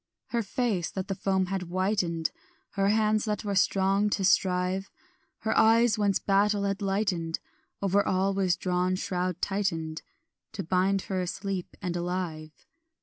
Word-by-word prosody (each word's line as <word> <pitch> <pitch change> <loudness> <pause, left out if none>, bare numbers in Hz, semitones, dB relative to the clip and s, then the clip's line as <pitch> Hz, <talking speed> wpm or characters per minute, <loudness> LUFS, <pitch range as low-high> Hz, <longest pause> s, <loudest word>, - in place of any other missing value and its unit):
Her 235 - 0
face 210 -4 -1
that 190 0 -5
the - - +1
foam 190 0 0
had 190 +1 -2
whitened, 180 -2 -1 0.4
Her 195 0 +1
hands 215 0 +2
that 210 -1 -2
were 200 - -1
strong 195 +1 +2
to 200 -2 0
strive, 185 0 +2 0.5
Her 220 - 0
eyes 225 0 +5
whence 200 -3 +2
battle 200 +1 +2
had 200 0 -1
lightened, 195 -5 0 0.5
Over 200 +1 +3
all 190 +1 +1
was 190 -2 +2
a - - -24
drawn 180 0 0
shroud 180 -1 -2
tightened 165 -6 -1 0.5
To - - -4
bind 190 +3 +1
her 190 -1 -2
asleep 185 +1 -4
and 175 -1 -2
alive. 175 -3 -4
195 Hz, 150 wpm, -28 LUFS, 180-200 Hz, 0.5 s, eyes